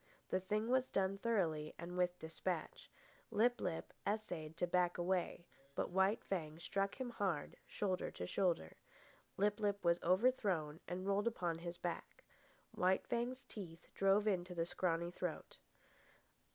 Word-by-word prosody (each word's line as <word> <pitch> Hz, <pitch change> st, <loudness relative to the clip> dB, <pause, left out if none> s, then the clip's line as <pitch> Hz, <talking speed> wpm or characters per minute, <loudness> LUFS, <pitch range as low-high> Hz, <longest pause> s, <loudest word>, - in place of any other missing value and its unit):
The 185 Hz, -, +3 dB
thing 210 Hz, +4 st, 0 dB
was 255 Hz, 0 st, +3 dB
done 195 Hz, 0 st, +1 dB
thoroughly 165 Hz, -10 st, +1 dB
and 175 Hz, +1 st, -6 dB
with 180 Hz, 0 st, +2 dB
despatch. 160 Hz, +1 st, -3 dB, 0.4 s
Lip 240 Hz, +2 st, +3 dB
lip 170 Hz, -3 st, -2 dB
essayed 175 Hz, -7 st, -2 dB
to 175 Hz, -, +2 dB
back 175 Hz, 0 st, +2 dB
away, 175 Hz, -1 st, 0 dB, 0.3 s
but -, -, -1 dB
White 190 Hz, +4 st, +3 dB
Fang 160 Hz, -5 st, -2 dB
struck 195 Hz, +3 st, -1 dB
him 255 Hz, -2 st, -2 dB
hard, 190 Hz, -10 st, -1 dB
shoulder 190 Hz, -3 st, -1 dB
to 90 Hz, -, -5 dB
shoulder. 170 Hz, -, 0 dB, 0.6 s
Lip 205 Hz, +2 st, +2 dB
lip 205 Hz, -3 st, 0 dB
was 170 Hz, 0 st, +4 dB
overthrown 185 Hz, -6 st, +2 dB
and 185 Hz, +1 st, -3 dB
rolled 200 Hz, +2 st, +2 dB
upon 175 Hz, -7 st, 0 dB
his 170 Hz, 0 st, -5 dB
back. 175 Hz, -1 st, -4 dB, 0.5 s
White 185 Hz, +1 st, +2 dB
Fang's 245 Hz, +2 st, -1 dB
teeth 170 Hz, -6 st, -9 dB
drove 195 Hz, +2 st, +4 dB
into 180 Hz, -3 st, 0 dB
the 165 Hz, -1 st, +1 dB
scrawny 170 Hz, -1 st, 0 dB
throat. 180 Hz, -2 st, -4 dB
185 Hz, 145 wpm, -39 LUFS, 170-205 Hz, 0.6 s, was